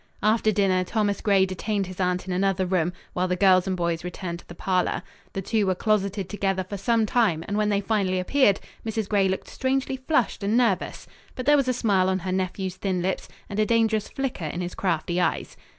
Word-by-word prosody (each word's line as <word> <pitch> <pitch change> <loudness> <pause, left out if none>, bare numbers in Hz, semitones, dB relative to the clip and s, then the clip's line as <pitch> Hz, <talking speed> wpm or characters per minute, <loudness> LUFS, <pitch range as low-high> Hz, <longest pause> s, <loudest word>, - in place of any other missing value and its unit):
After 215 +1 +3
dinner 190 -3 +2
Thomas 205 +1 -1
Gray 195 -2 +4
detained 195 +2 -2
his 185 0 -10
aunt 180 -1 0
in 185 - -2
another 190 0 +1
room, 180 -2 +1 0.2
while 180 +1 0
the 180 - 0
girls 185 0 +4
and 185 -1 -1
boys 170 -1 -1
returned 180 -1 -5
to - - -18
the 175 - -10
parlor. 185 0 0 0.3
The 195 - -3
two 215 0 +1
were 185 - +2
closeted 200 -2 0
together 195 -2 -1
for 185 +3 -7
some 225 +3 +1
time, 205 -8 +2
and 205 - -2
when 210 0 +1
they 200 -1 +1
finally 195 -4 0
appeared, 205 +1 +3 0.2
Mrs. 220 -2 -2
Gray 195 -2 +2
looked 190 - -3
strangely 265 0 -1
flushed 260 -2 0
and 205 +3 +1
nervous. 230 -7 0 0.3
But 255 - -5
there 295 - +6
was 275 -3 +2
a - - +3
smile 195 -6 +2
on 190 - +1
her 185 0 -4
nephew's 185 0 -2
thin 185 -3 -1
lips 190 +1 -2 0.2
and 200 - -4
a 215 - +4
dangerous 220 -2 +2
flicker 265 -11 -3
in 170 +4 -3
his 180 0 -4
crafty 175 -1 -1
eyes. - - -1
195 Hz, 215 wpm, -25 LUFS, 185-215 Hz, 0.3 s, there